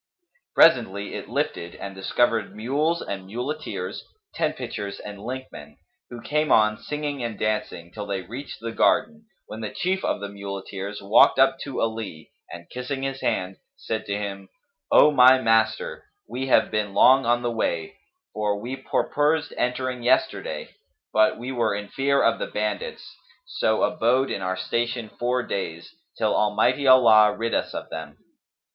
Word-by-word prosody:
Presently 105 -10 +4
it - - -7
lifted 85 0 -3
and 100 - -7
discovered 110 +3 0
mules 145 +10 0
and 95 -1 -6
muleteers, 125 +9 -5 0.3
tent 155 -1 -1
pitchers 100 -5 -5
and 105 -1 -9
linkmen, 120 - -8 0.3
who 120 -1 -9
came 150 +1 0
on, 110 0 +4
singing 150 -2 -4
and 115 -3 -4
dancing, 105 -6 -2
till 105 +1 -7
they 95 -2 -3
reached 125 +9 -8
the 115 0 -4
garden, 225 - +1 0.2
when 110 - -8
the 110 - -3
chief 190 - -2
of - - 0
the 100 - -5
muleteers 100 0 -6
walked 100 +3 +5
up 135 0 +4
to 140 - -5
Ali 110 -8 -4 0.2
and 85 0 -10
kissing 130 +2 -4
his 135 0 -3
hand, 95 +1 -1 0.2
said 110 -1 -4
to 100 0 -1
him, 100 -2 -6 0.4
"O 150 - +7
my 130 -1 +7
master, 130 - +1 0.2
we 135 +1 -4
have - - +3
been 105 -2 -2
long 130 -1 +6
on 120 +1 +2
the 120 - 0
way, 415 - -2 0.4
for 105 -1 -1
we 120 +5 -5
purposed 150 +3 0
entering 125 0 -2
yesterday; 125 +2 0 0.4
but 110 0 +4
we 125 +3 -5
were 115 -5 0
in 105 0 -6
fear 140 +1 +1
of - - +2
the - - -3
bandits, 485 -1 -4 0.3
so - - 0
abode 130 -1 +2
in - - -3
our 95 0 -2
station 115 +4 -2
four 125 +1 0
days, 85 -6 -5 0.2
till - - +1
Almighty 125 +6 +2
Allah 110 -5 +6
rid 115 +1 -2
us - - -1
of - - -6
them." 75 -1 -7
115 Hz, 160 wpm, -24 LUFS, 100-135 Hz, 0.4 s, O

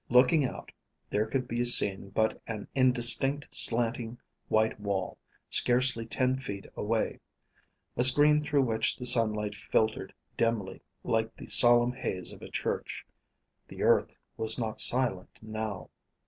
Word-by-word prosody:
Looking 125 +5 +3
out, - - -9 0.4
there 105 +2 -2
could 130 +2 -4
be 120 +1 -3
seen 100 -5 +2
but 110 +2 -3
an 110 -3 -8
indistinct 130 +2 +4
slanting 115 0 +3 0.3
white 110 0 -1
wall, 100 -3 -5 0.3
scarcely 120 -2 0
ten 130 +2 -2
feet 100 -7 -8
away: 110 +1 -4 0.8
a 125 - 0
screen 145 +4 +5
through 150 -2 -1
which 110 -3 -1
the 125 - -8
sunlight 110 -4 +4
filtered 110 +1 -3 0.2
dimly, 115 -5 -3 0.2
like 115 -1 -3
the - - -11
solemn 120 0 +4
haze 95 -7 -3
of - - -16
a - - -11
church. - - -6 0.6
The - - -9
earth - - 0 0.2
was 110 0 +3
not 110 -3 -3
silent, 120 -8 +1
now. 110 -2 -8
115 Hz, 135 wpm, -27 LUFS, 110-125 Hz, 0.8 s, screen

